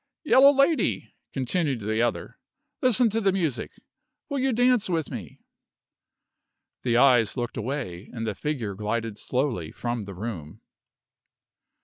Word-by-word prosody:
"Yellow 280 -2 +7
Lady," 280 +3 +1 0.2
continued 135 -1 -1
the 110 +2 0
other, 120 - -2 0.4
"listen 250 -3 +4
to 225 +2 0
the 195 -2 +3
music. 165 -9 -1 0.6
Will 280 -2 -1
you 265 +1 +2
dance 245 -3 +3
with 165 -3 -1
me?" 100 - -8 1.4
The 120 -2 +1
eyes 125 -3 +4
looked 120 -1 -3
away, 110 -7 -4
and 115 -1 -5
the 110 - -2
figure 120 -4 -3
glided 105 +1 -3
slowly 125 - -2
from 120 -3 -4
the 100 -1 -8
room. 90 -7 -7
125 Hz, 130 wpm, -26 LUFS, -, 1.4 s, Yellow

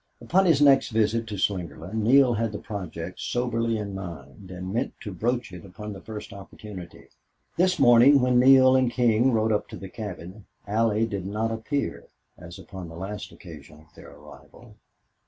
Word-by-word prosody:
Upon 190 +2 +2
his 150 -4 +4
next 135 -2 +5
visit 115 0 0
to 105 -1 -5
Slingerland 90 -2 -3
Neale 120 +4 +4
had 115 -1 -1
the - - -3
project 90 -4 -7
soberly 115 -2 -1
in 100 -2 -5
mind 85 -2 -9
and 90 +1 -6
meant 115 - -2
to 105 - -7
broach 120 +2 -2
it 90 - -9
upon 105 +3 -8
the 95 - -10
first 110 0 -8
opportunity. 95 -2 -11 0.5
This 185 +1 +2
morning, 125 +2 +6
when 125 -1 +3
Neale 130 0 +6
and 130 -2 +3
King 120 +1 +2
rode 110 -1 +1
up 105 - 0
to - - -9
the 95 - -9
cabin, 95 -1 -8 0.2
Allie 110 +1 +1
did 100 -4 -5
not 110 +3 -2
appear 125 +6 -3 0.3
as 85 -1 -11
upon 95 -3 -9
the 80 - -11
last 100 +4 -6
occasion 75 -3 -13
of - - -33
their - - -14
arrival. 75 +1 -16
105 Hz, 175 wpm, -25 LUFS, 95-120 Hz, 0.5 s, morning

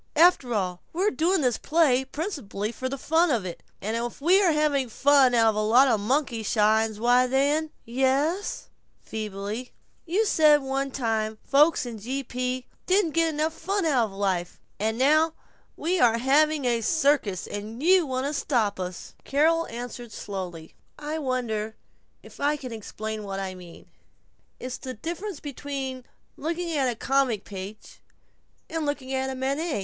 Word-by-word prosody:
After 320 -6 +5
all, 180 -3 -2
we're 385 +5 +1
doing 350 +1 +1
this 250 -4 +1
play 290 -5 +3
principally 265 - -4
for 260 +3 -4
the 275 - -4
fun 325 +5 +2
of 235 -9 0
it, 175 - -6 0.2
and 215 +3 -1
if 235 0 -3
we 350 +7 +5
have 300 - +2
fun 270 -1 +4
out 225 -1 +5
of 220 - -1
a 215 - +1
lot 240 +6 +5
of 225 -4 +2
monkey 250 +1 0
shines, 215 0 +2
why 245 +2 +4
then 285 +4 +1
" - - -41
"Ye 245 +3 -2
es," 325 - 0 0.3
feebly. 215 +3 -5 0.3
"You 395 +7 +2
said 305 -6 +5
one 270 +1 -1
time 225 -4 -1
that - - -33
folks 295 +1 +4
in 235 -3 -6
G. 260 +6 -3
P. 250 0 -3 0.2
didn't 375 -3 +3
get 330 +1 +2
enough 310 +1 -1
fun 390 +2 -2
out 265 -7 +3
of 210 - -8
life. 190 -3 -2 0.2
And 220 +2 0
now 310 +5 +4 0.4
we 355 +3 0
are 230 -4 +4
having 290 +3 +3
a 235 -2 +1
circus, 275 - +1
you 260 - +2
want 260 0 -2
us 290 +1 -1
to - - -1
stop!" 215 -8 0 0.4
Carol 325 +4 +2
answered 240 0 -7
slowly: 180 -6 -6 0.2
"I 300 +2 -4
wonder 230 -6 -2 0.5
if - - -15
I 290 +1 +1
can 255 -4 -7
explain 220 0 -6
what 195 -1 -4
I 190 -1 -4
mean? 180 -2 -13 0.7
It's 255 0 -5
the 255 -1 -6
difference 340 - -5
between 270 -3 -5 0.3
looking 335 +3 -3
at 275 -3 +2
the 240 - -2
comic 260 -4 +1
page 200 +2 -9 0.7
and 325 -1 -3
looking 270 -2 -3
at 265 0 -2
Manet. 280 +2 -1
260 Hz, 165 wpm, -26 LUFS, 220-305 Hz, 0.7 s, After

